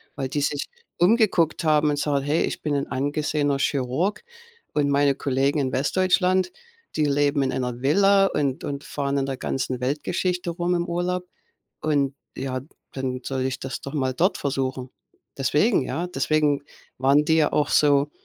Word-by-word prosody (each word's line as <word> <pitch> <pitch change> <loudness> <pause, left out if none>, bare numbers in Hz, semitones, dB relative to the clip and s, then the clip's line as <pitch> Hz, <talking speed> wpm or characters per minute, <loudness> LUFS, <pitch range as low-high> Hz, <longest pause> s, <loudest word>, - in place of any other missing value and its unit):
weil 135 -2 -2
die 145 +2 -1
sich 145 0 -1 0.3
umgeguckt 180 -4 +3
haben 155 -1 +3
und 145 - 0
sagen: 140 -2 0
„Hey, 150 +3 +1
ich - - -3
bin 150 -2 -1
‘n 140 - -1
angesehener 145 +1 0
Chirurg 140 - -1 0.5
und 145 -1 +1
meine 140 0 +3
Kollegen 140 +2 0
in 130 -2 0
Westdeutschland, 185 +6 +2 0.4
die 155 - +2
leben 145 0 +2
in 135 - 0
einer 125 -2 -3
Villa 195 +7 +4
und 145 -3 -1
und 140 0 -4
fahren 140 -1 -2
in 135 - 0
der 135 -1 -4
ganzen 130 -1 -2
Weltgeschichte 170 +6 -1
rum 175 +1 -1
im 170 0 0
Urlaub. 180 +1 -1 0.6
Und 145 -3 +1 0.2
ja, 130 -1 -3 0.3
dann 130 -1 -3
soll 135 -1 -3
ich 130 -1 -2
das 135 - -5
doch 140 - -7
mal 130 -3 0
dort 180 +9 +1
versuchen.“ 130 -2 -2 0.5
Deswegen, 150 - +2
ja? 170 - -3
Deswegen 155 -4 +1 0.4
waren 140 +3 +4
die 160 +1 +3
ja 155 -2 +3
auch 150 - +2
so. 145 0 +3
145 Hz, 170 wpm, -24 LUFS, 135-165 Hz, 0.6 s, Villa